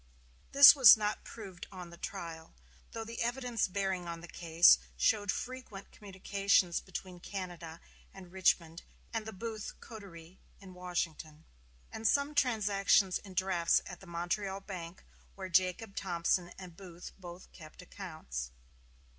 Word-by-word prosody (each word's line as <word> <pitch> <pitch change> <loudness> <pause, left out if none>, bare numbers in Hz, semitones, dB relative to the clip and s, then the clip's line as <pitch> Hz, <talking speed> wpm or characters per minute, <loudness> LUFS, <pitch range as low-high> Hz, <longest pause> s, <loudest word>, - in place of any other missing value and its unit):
This 280 +1 +10
was 260 -6 +9
not 210 0 -2
proved 190 -5 -10
on 180 -3 -9
the - - -11
trial; 170 -3 -8 0.4
though 225 - -5
the 230 +1 -6
evidence 240 0 -1
bearing 190 -2 -2
on 170 0 -6
the 175 - -10
case 165 - +5 0.2
showed 205 - +2
frequent 250 -6 -7
communications 195 -2 0
between 185 -1 -8
Canada 175 -4 -7 0.3
and 185 -2 -13
Richmond 175 -3 +1 0.3
and 225 -1 -3
the - - -5
Booth 220 +1 -6
coterie 185 -6 -12 0.2
in 190 -2 -13
Washington, 165 -3 -5 0.5
and 220 0 -2
some 285 +1 +2
transactions 205 -7 +2
in 190 -2 -13
drafts 185 -3 +2
at 180 - -9
the 195 - -15
Montreal 190 +3 -3
Bank, 180 -3 -9 0.3
where 190 -1 -7
Jacob 185 +3 +1
Thompson 175 -1 -1
and 180 -3 -11
Booth 180 -2 -11
both 175 0 -11
kept 160 +1 -13
accounts. 155 - -7
185 Hz, 140 wpm, -32 LUFS, 170-205 Hz, 0.5 s, This